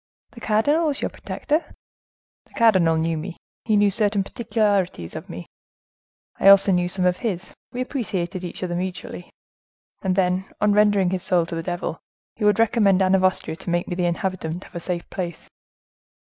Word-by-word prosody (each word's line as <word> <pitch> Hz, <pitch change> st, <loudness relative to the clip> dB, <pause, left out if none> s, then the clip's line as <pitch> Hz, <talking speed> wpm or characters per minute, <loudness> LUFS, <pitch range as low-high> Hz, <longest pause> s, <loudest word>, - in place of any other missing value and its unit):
"The 235 Hz, -, -12 dB
cardinal 285 Hz, +11 st, +2 dB
was 290 Hz, -, -1 dB
your -, -, -1 dB
protector?" 310 Hz, +3 st, -3 dB, 0.7 s
"The -, -, -22 dB
cardinal 185 Hz, -8 st, +4 dB
knew 165 Hz, +1 st, 0 dB
me; 170 Hz, +3 st, -6 dB, 0.3 s
he 215 Hz, -2 st, +3 dB
knew 205 Hz, -1 st, +4 dB
certain 205 Hz, -1 st, +1 dB
particularities 200 Hz, -, -1 dB
of -, -, -7 dB
me; 85 Hz, +1 st, -7 dB, 0.9 s
I -, -, +3 dB
also 195 Hz, 0 st, +7 dB
knew 180 Hz, -1 st, +2 dB
some 180 Hz, +1 st, -1 dB
of 180 Hz, 0 st, +2 dB
his; 190 Hz, -7 st, -3 dB, 0.2 s
we 250 Hz, -, -4 dB
appreciated 190 Hz, -9 st, -3 dB
each 175 Hz, +1 st, -5 dB
other 175 Hz, -1 st, -2 dB
mutually. 180 Hz, 0 st, -5 dB, 0.7 s
And 185 Hz, -1 st, 0 dB
then, 185 Hz, 0 st, 0 dB
on 210 Hz, 0 st, +3 dB
rendering 205 Hz, -3 st, +3 dB
his 185 Hz, -1 st, -2 dB
soul 175 Hz, -2 st, +2 dB
to 165 Hz, -, -6 dB
the 165 Hz, -, -2 dB
devil, 175 Hz, -1 st, -4 dB, 0.4 s
he 220 Hz, -, -6 dB
would 210 Hz, -1 st, +4 dB
recommend 210 Hz, -4 st, +3 dB
Anne 185 Hz, 0 st, +2 dB
of 190 Hz, -1 st, +3 dB
Austria 185 Hz, -3 st, 0 dB
to -, -, -7 dB
make 175 Hz, 0 st, 0 dB
me -, -, -3 dB
the 175 Hz, 0 st, 0 dB
inhabitant 175 Hz, -1 st, -3 dB
of -, -, -17 dB
a 170 Hz, -, -4 dB
safe 175 Hz, 0 st, -4 dB
place. 175 Hz, -4 st, -6 dB
185 Hz, 185 wpm, -23 LUFS, 175-210 Hz, 0.9 s, also